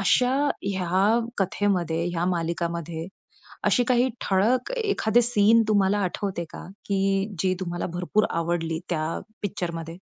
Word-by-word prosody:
अशा 250 +7 +3 0.3
ह्या 195 +4 +2 0.2
कथेमध्ये, 180 -4 0
ह्या 175 0 -1
मालिकामध्ये, 170 -1 -3 0.6
अशी 245 - +4
काही 250 +1 +3 0.2
ठळक 225 - +2
एखादे 245 - +2
सीन 230 -1 +4
तुम्हाला 205 -1 +3
आठवते 185 -1 -2
का? - - -9 0.2
की 195 +1 0
जी 185 +3 +2
तुम्हाला 175 -1 -3
भरपूर 180 +4 +1
आवडली 165 -1 -1
त्या 160 -1 -1 0.2
पिक्चरमध्ये? 170 -4 -4
190 Hz, 120 wpm, -25 LUFS, 170-210 Hz, 0.6 s, अशी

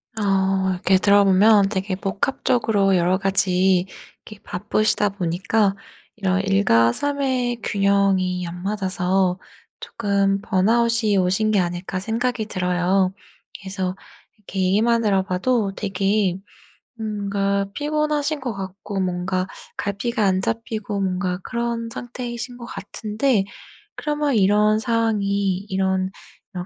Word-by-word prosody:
어 195 -2 +1
이렇게 185 +1 +2
들어보면 200 +1 +5
되게 190 -2 -2
복합적으로 200 0 +1
여러 180 +1 +2
가지 190 -1 +2 0.4
이렇게 215 -2 -12
바쁘시다 210 +2 0
보니까 195 +2 0 0.4
이런 190 -2 0
'일과 155 - +3
삶의 260 - -1
균형이 195 -3 +1
안 175 +1 -8
맞아서 190 -2 0 0.4
쪼끔 200 -2 0
번아웃이 220 +1 +2
오신 190 +4 +2
게 205 - +3
아닐까.' 175 +1 -2
생각이 225 +2 -1
들어요. 185 +1 +1 0.5
그래서 190 -1 -4 0.4
이렇게 195 -2 -7
얘기만 225 +5 +2
들어 195 -2 +3
봐도 200 +3 0
되게 195 -1 0 0.7
음 215 -1 -3
뭔가 200 0 0
피곤하신 300 0 -1
것 245 -5 -4
같고 195 +1 -5
뭔가 185 0 -1 0.3
갈피가 215 +3 -1
안 190 -1 +2
잡히고 220 -1 -3
뭔가 185 -1 -1
그런 235 -1 -3
상태이신 245 0 -6
것 240 - -9
같은데 215 -1 -1 0.5
그러면 295 -3 -1
이런 210 +1 +4
상황이 205 -5 0
이런 190 0 0 0.4
이런 180 -1 -5
200 Hz, 265 characters per minute, -22 LUFS, 190-220 Hz, 0.7 s, 들어보면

